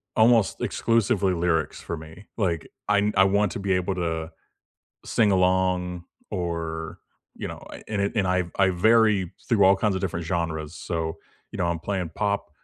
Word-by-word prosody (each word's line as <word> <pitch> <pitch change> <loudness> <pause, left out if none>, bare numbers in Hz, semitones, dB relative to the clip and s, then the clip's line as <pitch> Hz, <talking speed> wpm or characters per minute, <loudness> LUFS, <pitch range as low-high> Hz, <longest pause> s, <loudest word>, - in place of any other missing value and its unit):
almost 115 -2 +4
exclusively 105 -4 +1
lyrics 85 -1 0
for - - -5
me, 80 +5 -12
like, 85 -7 -1 0.2
I 105 - +4
n 105 +1 +1
I 95 - +6
want 100 0 +2
to - - -5
be 100 -1 0
able 90 +1 0
to 80 -2 -2 0.7
sing 110 -3 +2
along 90 -1 +1 0.3
or 80 -2 -4 0.4
you - - -5
know, - - -8
a - - -10
and 105 -2 -2
it 100 - 0
and 105 -4 +1
I 90 0 +1
I 95 -1 +4
vary 105 -1 +3 0.2
through 115 -6 +3
all 95 +1 +6
kinds 105 0 +1
of 95 - -2
different 85 -3 -3
genres, 80 -2 -2
so, 80 -2 -3 0.4
you - - -7
know, 90 - +1
I'm 85 -1 -1
playing 90 0 -3
pop 100 -5 -1
95 Hz, 180 wpm, -25 LUFS, 85-100 Hz, 0.7 s, I